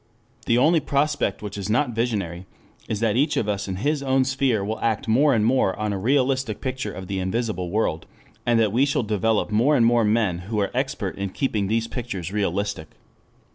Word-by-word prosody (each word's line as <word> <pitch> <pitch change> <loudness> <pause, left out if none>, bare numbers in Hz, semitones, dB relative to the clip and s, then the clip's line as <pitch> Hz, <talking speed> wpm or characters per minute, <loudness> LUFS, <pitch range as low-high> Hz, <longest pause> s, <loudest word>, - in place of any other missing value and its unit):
The 120 -2 +3
only 160 +6 +4
prospect 145 -8 0
which 105 0 -5
is 100 +1 -4
not 125 +4 +2
visionary 100 -7 -2 0.4
is 110 -1 -3
that 115 -2 +2
each 140 +6 +2
of 110 - 0
us 100 -1 -2
in 95 - -3
his 145 +9 -1
own 135 -1 +2
sphere 130 -6 0
will 110 +2 -3
act 115 -1 -1
more 135 +7 +4
and 105 -1 +2
more 120 -5 +2
on 105 0 -1
a 100 - -3
realistic 130 0 +1
picture 130 -1 -3
of 95 - -8
the 95 +1 -3
invisible 95 -1 -2
world, 95 -5 -1 0.4
and 120 -1 +2
that 110 -3 +2
we 125 +4 +3
shall 140 -3 +1
develop 110 0 0
more 120 +8 +3
and 115 - +4
more 120 0 +4
men 105 -5 +1
who 110 -2 -1
are 100 - 0
expert 130 -6 -2
in 100 0 -2
keeping 110 -2 -1
these 115 +2 0
pictures 105 -8 -5
realistic. 100 -3 -2
110 Hz, 205 wpm, -23 LUFS, 100-130 Hz, 0.4 s, only